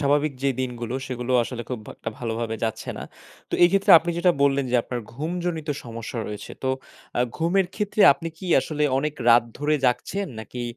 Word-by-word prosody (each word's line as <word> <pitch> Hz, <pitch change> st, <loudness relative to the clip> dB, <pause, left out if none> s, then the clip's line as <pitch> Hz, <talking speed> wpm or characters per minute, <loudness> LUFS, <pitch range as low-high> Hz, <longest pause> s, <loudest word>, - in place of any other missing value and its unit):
স্বাভাবিক 145 Hz, +1 st, +2 dB
যে 140 Hz, -, +3 dB
দিনগুলো 120 Hz, -2 st, -4 dB
সেগুলো 125 Hz, 0 st, -3 dB
আসলে 120 Hz, 0 st, -5 dB
খুব 125 Hz, -4 st, -4 dB, 0.2 s
একটা -, -, -5 dB
ভালোভাবে 115 Hz, -1 st, -3 dB
যাচ্ছে 110 Hz, -, -3 dB
না। -, -, -5 dB, 0.5 s
তো -, -, -1 dB
এই 175 Hz, -, +7 dB
ক্ষেত্রে, 195 Hz, +2 st, +2 dB
আপনি 170 Hz, +2 st, -3 dB
যেটা 180 Hz, 0 st, +4 dB
বললেন 140 Hz, -1 st, +3 dB
যে 125 Hz, -, +3 dB
আপনার 125 Hz, 0 st, -4 dB
ঘুমজনিত 165 Hz, +2 st, -3 dB, 0.2 s
সমস্যা 115 Hz, 0 st, -6 dB
রয়েছে। 105 Hz, -1 st, -7 dB
তো 130 Hz, -, 0 dB, 0.5 s
আ -, -, +3 dB, 0.2 s
ঘুমের 175 Hz, +3 st, +2 dB
ক্ষেত্রে 210 Hz, 0 st, -2 dB
আপনি 165 Hz, +2 st, -6 dB
কি 185 Hz, -, -7 dB
আসলে 150 Hz, -1 st, -3 dB, 0.2 s
অনেক 150 Hz, +2 st, -1 dB
রাত 120 Hz, 0 st, +7 dB
ধরে 150 Hz, +1 st, +1 dB
জাগছেন? 195 Hz, +10 st, 0 dB
নাকি 120 Hz, +2 st, -7 dB
140 Hz, 185 wpm, -24 LUFS, 120-165 Hz, 0.5 s, এই